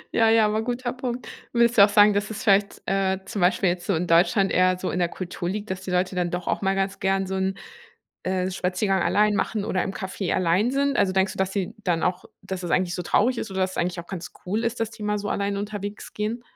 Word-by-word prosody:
Ja, 225 -1 +5
ja 225 -1 +5
aber 215 +1 +1
guter 245 +1 -2
Punkt. 250 -1 -5 0.3
Würdest 235 0 +3
du - - +11
auch 205 - +6
sagen, 205 0 +6
dass 205 +1 -1
es 220 +2 -6
vielleicht, 200 -2 +2
äh, 190 -1 +1
zum 195 0 -4
Beispiel 180 +1 +3
jetzt 175 0 -3
so 195 - +2
in 175 +2 -1
Deutschland 185 +4 +3
eher 185 0 +3
so 185 - -3
in 180 - -2
der 175 -1 +1
Kultur 175 -1 -5
liegt, 205 +1 -4
dass 190 0 -4
die 190 - -7
Leute 180 +1 0
dann 175 -1 0
doch 175 0 -4
auch - - 0
mal 195 0 +1
ganz 195 0 -1
gern 195 0 +1
so 190 - -5
'n, 190 0 -1 0.7
äh, 185 0 -1
Spaziergang 190 +1 0
allein 210 0 +3
machen 210 0 -1
oder 185 -5 0
im - - -3
Café 190 -1 -3
allein 185 +7 +2
sind? 280 +1 +1
Also, 185 - +3
denkst 190 0 +1
du, - - -12
dass 190 0 0
sie 195 0 -2
dann 170 -3 0
auch 180 0 0 0.2
dass 190 -1 -6
es 175 - -3
eigentlich 180 -1 +1
so 180 - -3
traurig 235 +8 +2
ist 220 - -4
oder 190 - -3
dass 185 0 +1
es - - -8
eigentlich 175 0 -1
auch 170 - -9
ganz 185 -3 -6
cool 210 +5 -1
ist, 230 -1 -2
dass 225 -1 -1
die 215 - -10
mal 210 0 0
so 205 0 -4
alleine 200 0 -1
unterwegs 205 0 -6
gehen? 215 +3 -3
195 Hz, 265 wpm, -24 LUFS, 185-210 Hz, 0.7 s, du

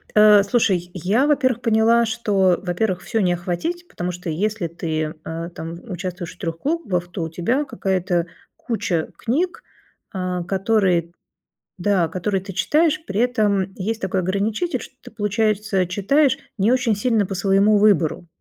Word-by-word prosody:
Э, 210 -1 +7
слушай, 195 -4 +1
я 195 - +1
во-первых 260 -5 +2
поняла, 230 +1 +4
что 195 -5 +2
во-первых 180 +1 -1
всё 225 -2 -1
не 180 -3 +2
охватить, 180 - -3
потому 180 +1 -4
что 180 0 -7
если 200 +4 -1
ты, 160 -2 -3
э, 165 +1 -5
там 165 +1 -6
участвуешь 180 -2 -5
в - - -29
3 165 -1 -4
клубах, 200 - -2
то 180 - -4
у 160 - -2
тебя 230 - 0
какая-то 185 -7 -1 0.3
куча 180 -9 -2
книг, 325 +10 -1 0.5
а, 180 -2 -3
которые, 190 -3 +1 0.7
да, 185 -2 +2
которые 190 +3 -2
ты 195 +1 -8
читаешь, 310 - +2
при 200 - -3
этом 205 -6 +1
есть 220 +4 -3
такой 190 0 0
ограничитель, 205 - -1
что - - -12
ты - - -12
получается 210 -2 0
читаешь 255 +10 +2 0.2
не 205 +3 +3
очень 250 -4 +2
сильно 215 0 +1
по 195 - -5
своему 195 +2 +3
выбору, 180 -5 +2
195 Hz, 155 wpm, -21 LUFS, 180-225 Hz, 0.7 s, Э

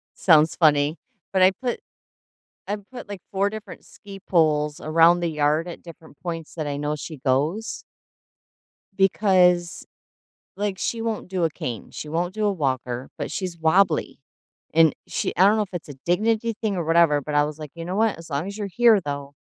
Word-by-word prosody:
sounds 160 -3 +4
funny, 150 -1 +3 0.4
but 190 - +2
I 185 - +7
put 245 -2 -2 0.9
I 205 - -1 0.2
put, 245 -4 -9
like, 200 -2 -6
4 200 +1 +1
different 215 0 -9
ski 195 -1 -12
poles 150 -3 +2
around 165 +2 +4
the 170 - 0
yard 150 +2 +1
at 175 - -9
different 160 -4 -14
points 165 -3 -5
that 155 -3 -4
I 145 -1 -3
know 150 +1 -2
she 155 0 -8
goes 145 - -1 1.1
because, 180 -3 +3 0.7
like, 205 -1 -2
she 230 +3 -2
won't 225 -2 -3
do 185 -1 -2
a 165 - +3
cane. 120 -7 -6
She 150 - -7
won't 175 +3 -1
do 215 0 -1
a 205 - +3
walker, 130 -7 -2
but - - -4
she's 180 -3 -4
wobbly. 165 +1 +2 0.5
And 160 -1 +5
she - - -2
I 190 - +6
don't 210 - +4
know 215 - +2
if 195 - -13
it's 175 -3 -6
a 145 - -8
dignity 220 +6 +1
thing 215 -3 0
or 170 - -2
whatever, 165 -3 +4
but 150 +2 -6
I 145 - +5
was 150 0 -6
like, 150 -2 -8
"You 165 0 -7
know 180 +2 -3
what? 220 -2 +1
As 165 - -12
long 145 +2 -2
as 200 - -6
you're 205 -2 -3
here, 225 +1 +4
though, 140 -2 -5
170 Hz, 195 wpm, -23 LUFS, 150-195 Hz, 1.1 s, I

